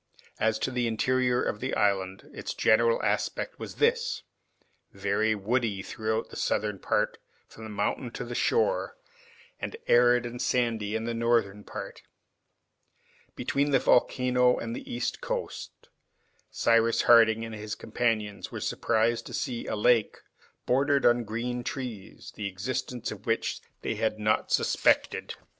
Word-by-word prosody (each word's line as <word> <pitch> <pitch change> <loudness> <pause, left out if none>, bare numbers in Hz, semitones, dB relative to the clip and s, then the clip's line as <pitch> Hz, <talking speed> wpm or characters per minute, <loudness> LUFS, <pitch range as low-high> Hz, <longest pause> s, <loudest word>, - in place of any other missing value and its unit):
As 110 0 +2
to 130 - -2
the 125 -1 0
interior 125 +2 +1
of 105 - -2
the 130 +3 -2
island, 95 -2 0
its - - -5
general 115 +1 +3
aspect - - -1
was - - -7
this, 470 +2 +1 0.7
very 100 +3 0
woody 105 -1 -1
throughout 110 +2 -2
the - - -9
southern 105 -2 -1
part - - 0 0.3
from 110 - -11
the - - -7
mountain 105 +4 -2
to - - -4
the 120 - -6
shore, 470 - +1 0.6
and 455 - -5
arid 120 0 +5
and 120 +1 -5
sandy 115 -4 0
in 110 - -1
the 115 0 -2
northern 115 -3 +1
part. - - -8 1.3
Between 140 +1 0
the 135 - +4
volcano 125 0 +3
and 115 0 -4
the - - -8
east 120 0 -2
coast - - -5 0.6
Cyrus 115 0 +3
Harding 115 -1 +6
and 115 - -7
his 105 0 -5
companions 110 -4 -2
were - - -5
surprised 115 +1 0
to - - -6
see 120 -2 -3
a - - -1
lake, 110 +1 +3 0.5
bordered 140 +2 +2
with 120 -2 +3
green 120 +3 -3
trees, 120 -8 -6
the 105 - -3
existence 120 +5 -4
of 105 0 -10
which 115 0 0 0.2
they - - -1
had 110 -1 -1
not 105 0 +1
suspected. - - +2
115 Hz, 145 wpm, -28 LUFS, 110-125 Hz, 1.3 s, Harding